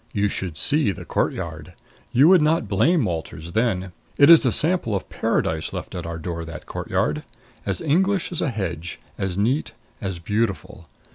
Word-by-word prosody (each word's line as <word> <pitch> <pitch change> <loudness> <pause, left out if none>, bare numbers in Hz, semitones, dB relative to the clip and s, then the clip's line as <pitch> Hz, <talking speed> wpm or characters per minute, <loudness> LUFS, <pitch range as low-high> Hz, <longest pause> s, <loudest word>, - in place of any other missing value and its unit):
You 105 0 +1
should 90 -5 -4
see 150 - +2
the - - -8
courtyard! - - -2 0.4
You 130 +5 +6
would 185 -1 +7
not 160 +3 +2
blame 130 - +3
Walters 85 -2 -5
then. 95 -3 0 0.3
It 145 +3 +8
is 160 -5 +8
a - - +3
sample 160 - +1
of 95 - -3
Paradise 80 -1 -1
left - - -6
at 85 -2 -5
our 85 0 -4
door 85 0 -4
that 80 -1 -8
courtyard. 75 0 -1 0.5
As - - -1
English 185 +5 +1
as 175 - -2
a 150 - +1
hedge, 90 -7 -4 0.2
as 95 -2 -2
neat, 120 +9 0 0.3
as 95 -3 -3
beautiful. 95 -3 -2
105 Hz, 170 wpm, -23 LUFS, -, 0.5 s, It